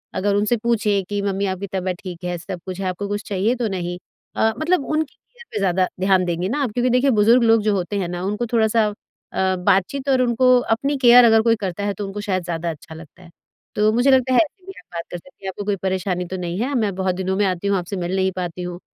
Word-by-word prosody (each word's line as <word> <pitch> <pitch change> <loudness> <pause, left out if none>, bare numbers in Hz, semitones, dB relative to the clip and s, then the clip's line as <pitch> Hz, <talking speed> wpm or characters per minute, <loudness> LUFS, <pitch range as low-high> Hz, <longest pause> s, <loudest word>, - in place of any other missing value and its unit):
अगर 200 +2 +1
उनसे 210 +4 +2
पूछें 215 -3 +1
कि, 205 +2 -3
"मम्मी, 200 0 -1
आपकी 190 +1 -3
तबीयत 185 -1 -3
ठीक 180 -2 -8
है, 180 -1 -2
सब 180 +1 -7
कुछ 185 -1 -6
है? 195 - -3
आपको 185 +2 -3
कुछ 205 +1 -3
चाहिए 205 +5 +1
तो 230 - +1
नहीं?" 175 -3 -3 0.4
अ, 220 - +2
मतलब 315 -2 +1
उनकी 310 -2 -2
केयर 485 -1 -19
पे - - -3
ज़्यादा 185 -1 +2
ध्यान 190 -1 +3
देंगे 175 +1 -1
ना 290 - -1
आप 250 - -2
क्योंकि 245 +3 0
देखिए 250 +3 +3
बुज़ुर्ग 235 +4 +5
लोग 225 -1 +4
जो 210 0 +1
होते 190 +2 -2
हैं 180 - -2
ना, 175 0 -4
उनको 210 +5 -2
थोड़ा-सा 220 -1 +3 0.5
अ, 190 0 +1
बातचीत 195 +10 0
और 260 -1 +3
उनको 250 +1 +3 0.3
अपनी 275 +4 -2
केयर 245 -1 +7
अगर 225 -1 +5
कोई 230 0 +3
करता 190 +1 -3
है 205 - 0
तो 205 +2 -5
उनको 195 +1 -5
शायद 190 -3 -1
ज़्यादा 170 0 -3
अच्छा 160 +1 -11
लगता 160 +2 -14
है। 170 - -15 0.5
तो 210 +1 +3
मुझे 245 +4 +3
लगता 260 0 +3
है, - - +5
ऐसे 360 +4 -13
भी 385 - -8
आप 225 - -19
बात 170 - -3
कर 175 - -4
सकती 265 +4 -19
हैं, 190 - -2
"आपको 195 +2 -6
कोई 205 0 0
परेशानी 185 -1 -2
तो 185 +2 -5
नहीं 175 +1 -4
है? 275 +4 -1
मैं 215 -5 0
बहुत 185 -1 -1
दिनों 190 +1 -2
में 205 - +2
आती 185 0 -1
हूँ, 200 -1 +2
आपसे 180 +2 -4
मिल 175 +2 -2
नहीं 190 0 +1
पाती 180 -1 -4
हूँ।" 175 0 -6
200 Hz, 260 wpm, -21 LUFS, 185-230 Hz, 0.5 s, केयर